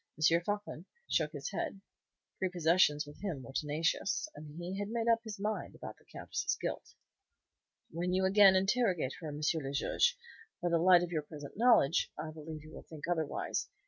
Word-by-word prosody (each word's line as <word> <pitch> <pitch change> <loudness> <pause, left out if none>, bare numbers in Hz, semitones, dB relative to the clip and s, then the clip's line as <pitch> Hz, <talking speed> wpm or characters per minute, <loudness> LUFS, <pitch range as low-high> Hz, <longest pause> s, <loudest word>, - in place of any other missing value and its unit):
Floçon 170 +2 +1 0.2
shook 150 -2 +1
his 145 +3 -5
head. 195 0 -3 0.6
Prepossessions 170 -4 +3
with 145 0 -13
him 170 -10 -3
were 135 - -10
tenacious, 160 - 0
and 150 +1 -11
he 180 +3 -4
had 205 0 -3
made 230 0 -1
up 230 -1 +5
his 215 -3 -7
mind 210 +2 -3
about - - -8
the - - -25
Countess's - - -3
guilt. - - -5 1.0
"When 175 +3 -2
you 190 +1 +2
again 195 0 +7
interrogate 190 - +1
her, 165 - -6
M. 150 0 -6
le 145 -4 -3
Juge, 480 - +2 0.4
by 175 - 0
the 170 -1 +3
light 175 0 +6
of 175 - -4
your 160 -3 0
present 145 -1 -10
knowledge, 210 - +4
I 155 +1 -5
believe 155 0 -8
you 155 - -13
will - - -9
think 155 -1 -9
otherwise. 160 -4 -1
170 Hz, 175 wpm, -33 LUFS, 155-195 Hz, 1.0 s, again